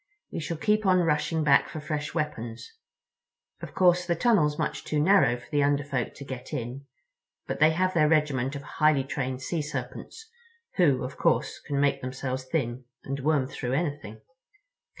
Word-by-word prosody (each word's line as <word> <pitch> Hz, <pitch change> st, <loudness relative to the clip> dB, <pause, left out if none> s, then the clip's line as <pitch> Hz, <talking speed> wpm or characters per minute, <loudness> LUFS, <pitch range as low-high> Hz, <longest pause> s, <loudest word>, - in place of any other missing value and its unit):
We -, -, -4 dB
shall 165 Hz, +1 st, -4 dB
keep 215 Hz, +5 st, +1 dB
on 185 Hz, -1 st, +5 dB
rushing 160 Hz, 0 st, +1 dB
back 140 Hz, -2 st, +4 dB
for 155 Hz, -, -6 dB
fresh 150 Hz, 0 st, -4 dB
weapons. 120 Hz, -, -4 dB, 0.9 s
Of -, -, -9 dB
course 180 Hz, -1 st, +4 dB
the 170 Hz, -, +1 dB
tunnel's 170 Hz, -8 st, +2 dB
much -, -, -2 dB
too 150 Hz, -, -1 dB
narrow 155 Hz, -7 st, +4 dB
for 120 Hz, -, -15 dB
the 145 Hz, -1 st, +2 dB
Under 145 Hz, 0 st, +2 dB
Folk 135 Hz, -4 st, -3 dB
to 140 Hz, -, -9 dB
get 130 Hz, +2 st, -8 dB
in, 135 Hz, +1 st, -5 dB, 0.6 s
but -, -, -4 dB
they 155 Hz, +1 st, +6 dB
have 185 Hz, +3 st, +1 dB
their 155 Hz, -3 st, +3 dB
regiment 145 Hz, -4 st, +1 dB
of 140 Hz, -, -6 dB
highly 150 Hz, -2 st, +2 dB
trained 130 Hz, -2 st, -4 dB
Sea 165 Hz, +3 st, -2 dB
Serpents, 150 Hz, -, -6 dB, 0.5 s
who, 145 Hz, -9 st, +3 dB
of 130 Hz, +2 st, -6 dB
course, -, -, +1 dB
can 140 Hz, -1 st, -1 dB
make 140 Hz, -1 st, +2 dB
themselves 130 Hz, 0 st, -4 dB
thin 130 Hz, -3 st, -2 dB, 0.2 s
and 140 Hz, +1 st, -4 dB
worm 145 Hz, -1 st, +2 dB
through 130 Hz, -1 st, -4 dB
anything." 140 Hz, -8 st, -3 dB
145 Hz, 175 wpm, -27 LUFS, 130-160 Hz, 0.9 s, they